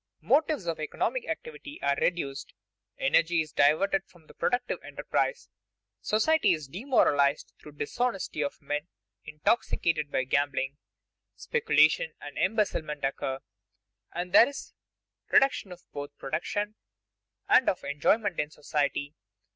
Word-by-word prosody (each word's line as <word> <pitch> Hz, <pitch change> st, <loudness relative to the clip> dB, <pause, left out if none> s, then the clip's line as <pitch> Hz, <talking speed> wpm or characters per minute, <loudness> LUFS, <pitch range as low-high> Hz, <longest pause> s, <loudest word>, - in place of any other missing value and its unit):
Motives 285 Hz, -, +2 dB
of 165 Hz, -2 st, -2 dB
economic 480 Hz, -, -2 dB
activity 440 Hz, -11 st, -6 dB
are 140 Hz, 0 st, +2 dB
reduced; 140 Hz, -6 st, -2 dB, 0.4 s
energy 170 Hz, 0 st, +3 dB
is 155 Hz, -1 st, -6 dB
diverted 185 Hz, +7 st, +3 dB
from 175 Hz, -3 st, -21 dB
productive 245 Hz, 0 st, 0 dB
enterprise; -, -, -2 dB, 0.5 s
society 255 Hz, -, +3 dB
is 155 Hz, -4 st, -5 dB
demoralized 145 Hz, -, +2 dB
through 150 Hz, -, -12 dB
dishonesty 195 Hz, +3 st, -2 dB
of 140 Hz, -, -4 dB
men 150 Hz, +3 st, -3 dB, 0.4 s
intoxicated 150 Hz, -1 st, 0 dB
by 130 Hz, -, +1 dB
gambling; 140 Hz, +1 st, 0 dB, 0.6 s
speculation 475 Hz, +1 st, +2 dB
and -, -, -9 dB
embezzlement 155 Hz, -10 st, 0 dB
occur; 135 Hz, -1 st, -2 dB, 0.7 s
and 175 Hz, +1 st, -5 dB
there 235 Hz, -, +8 dB
is 285 Hz, -, -9 dB, 0.6 s
a -, -, -22 dB
reduction 265 Hz, -7 st, +4 dB, 0.2 s
both 145 Hz, 0 st, -5 dB
of 145 Hz, -, -54 dB
production 205 Hz, +9 st, -2 dB, 0.7 s
and 255 Hz, -, +5 dB
of 185 Hz, -, -2 dB
enjoyment 190 Hz, +7 st, +1 dB
in 150 Hz, -, 0 dB
society. 145 Hz, -1 st, -2 dB
165 Hz, 120 wpm, -28 LUFS, 145-235 Hz, 0.7 s, there